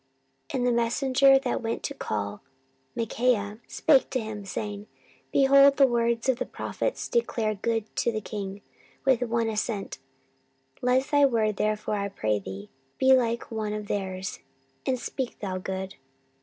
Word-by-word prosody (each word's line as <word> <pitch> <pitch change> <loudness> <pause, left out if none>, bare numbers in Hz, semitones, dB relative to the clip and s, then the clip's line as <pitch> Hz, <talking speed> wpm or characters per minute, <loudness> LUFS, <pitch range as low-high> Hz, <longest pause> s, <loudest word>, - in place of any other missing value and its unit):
14:018:012 - - -4
And 245 - 0
the 235 -1 +3
messenger 270 +3 +4
that 265 -2 -1
went 225 0 -3
to 280 - -3
call 105 - -4 0.5
Micaiah 225 -2 0
spake 290 -5 +3
to 260 - -1
him, 215 -3 -6
saying, 205 +1 -5 0.4
Behold, 275 0 +6
the 275 - +7
words 235 -1 +1
of 260 -2 +2
the - - -1
prophets - - -3
declare 230 - 0
good 220 +1 -2
to 235 - +2
the 215 - -2
king 200 -2 -6 0.4
with 260 -3 +4
one 230 -1 0
assent; 215 -1 -3 0.8
let 250 +2 +3
thy 290 -1 +3
word 215 -5 +1
therefore, 215 0 0
I 200 0 -2
pray 110 - -1
thee, 95 +1 -8 0.3
be 265 0 +5
like 235 -2 +1
one 215 -2 -2
of 210 0 -4
their's, 190 -1 -3 0.5
and 260 - +2
speak 260 0 -4
thou 190 -2 -4
good. 190 0 -5
225 Hz, 155 wpm, -27 LUFS, 205-255 Hz, 0.8 s, the